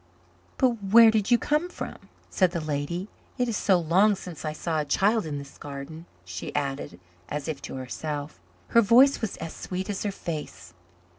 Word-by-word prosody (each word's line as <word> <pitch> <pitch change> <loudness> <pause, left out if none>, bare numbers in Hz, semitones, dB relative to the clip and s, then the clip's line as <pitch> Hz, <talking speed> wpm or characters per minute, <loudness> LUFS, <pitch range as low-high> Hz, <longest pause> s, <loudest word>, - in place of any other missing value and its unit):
"But 240 -4 +2
where 220 +3 +7
did 220 -1 0
you 240 - +6
come 300 +8 0
from?" - - -6 0.4
said 185 -2 +3
the 170 - -1
lady. 155 +4 -3 0.3
"It 250 -1 +1
is 230 - -1
so 195 -2 +3
long 185 +5 +4
since 180 -4 -9
I 155 - -2
saw 160 +1 -2
a 150 - -1
child 205 +5 +2
in 145 -2 -3
this 140 -1 -10
garden," 145 +4 -8 0.2
she 90 0 -6
added, 135 -10 -3 0.3
as 150 0 -4
if 150 -3 -4
to - - -7
herself. 145 - -5 0.3
Her 235 - +6
voice 250 +6 +5
was 220 - -3
as 165 - -6
sweet 185 +2 -4
as 195 - -4
her 205 - -1
face. 150 - -6
170 Hz, 190 wpm, -26 LUFS, 145-215 Hz, 0.4 s, where